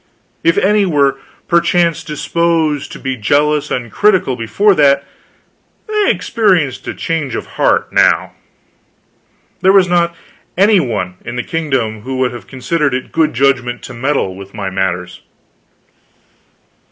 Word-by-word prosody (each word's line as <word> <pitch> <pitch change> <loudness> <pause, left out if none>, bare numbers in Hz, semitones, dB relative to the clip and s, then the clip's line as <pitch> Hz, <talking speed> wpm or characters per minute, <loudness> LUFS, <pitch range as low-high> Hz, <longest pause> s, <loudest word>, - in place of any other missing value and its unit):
If 165 +1 +3
any 210 +2 +3
were 140 -6 +1 0.3
perchance 170 -1 +2
disposed 160 -1 -1
to - - -8
be 130 -1 -3
jealous 145 +6 +1
and 120 -3 -3
critical 190 -11 +2
before 195 - +2
that, 140 -4 +3 0.8
they 425 -2 +1
experienced 175 - +1
a - - -4
change 160 -6 -3
of - - -4
heart, - - 0
now. - - +3 1.3
There 190 - +5
was 195 -2 +5
not 170 -1 +1 0.4
any 200 +1 +5
one 100 - -3
in 120 - -6
the 125 - -2
kingdom 130 -10 -2
who 130 +4 -5
would 130 -1 +1
have 120 -1 -10
considered 140 +1 -1
it 130 - -5
good 155 -5 +1
judgment 125 -2 +1
to - - -8
meddle 125 -6 -1
with 100 +1 -11
my 100 -3 -4
matters. 90 -2 -3
140 Hz, 140 wpm, -15 LUFS, 120-170 Hz, 1.3 s, There